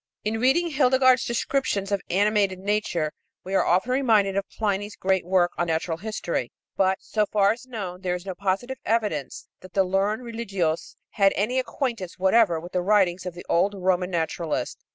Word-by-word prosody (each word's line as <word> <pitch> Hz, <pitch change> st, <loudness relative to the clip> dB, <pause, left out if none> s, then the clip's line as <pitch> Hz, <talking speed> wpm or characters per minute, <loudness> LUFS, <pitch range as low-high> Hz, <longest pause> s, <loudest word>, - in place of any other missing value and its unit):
In 220 Hz, +1 st, -1 dB
reading 310 Hz, +8 st, +2 dB
Hildegard's 260 Hz, -2 st, +4 dB
descriptions 235 Hz, -5 st, -1 dB
of 200 Hz, -2 st, 0 dB
animated 200 Hz, 0 st, +2 dB
nature 190 Hz, -5 st, -1 dB, 0.3 s
we 190 Hz, -, -6 dB
are 195 Hz, -, +4 dB
often 185 Hz, +8 st, +2 dB
reminded 220 Hz, -7 st, +3 dB
of 200 Hz, 0 st, -2 dB
Pliny's 205 Hz, -1 st, -2 dB
great 190 Hz, -1 st, +1 dB
work 180 Hz, -1 st, +3 dB
on 175 Hz, -, +1 dB
natural 165 Hz, 0 st, -1 dB
history; 175 Hz, -, -3 dB, 0.2 s
but, 190 Hz, 0 st, +2 dB
so 215 Hz, -1 st, -1 dB
far 200 Hz, -1 st, +3 dB
as 235 Hz, +3 st, -6 dB
known, 190 Hz, -7 st, -6 dB
there 180 Hz, -2 st, -1 dB
is 180 Hz, +1 st, -7 dB
no 190 Hz, -, -4 dB
positive 200 Hz, +7 st, -2 dB
evidence 210 Hz, -, -2 dB
that 185 Hz, -1 st, -14 dB
the 195 Hz, -, +3 dB
learned 195 Hz, +5 st, 0 dB
religieuse 195 Hz, -9 st, -2 dB, 0.2 s
had 195 Hz, -2 st, +3 dB
any 230 Hz, +7 st, +1 dB
acquaintance 235 Hz, -, -3 dB
whatever 190 Hz, -2 st, +3 dB
with 175 Hz, +2 st, -10 dB
the 180 Hz, -, 0 dB
writings 185 Hz, -2 st, +2 dB
of 175 Hz, -, -6 dB
the 175 Hz, -, -10 dB
old 195 Hz, +4 st, +2 dB
Roman 185 Hz, -1 st, 0 dB
naturalist. 165 Hz, -5 st, -2 dB
195 Hz, 175 wpm, -25 LUFS, 180-225 Hz, 0.3 s, Hildegard's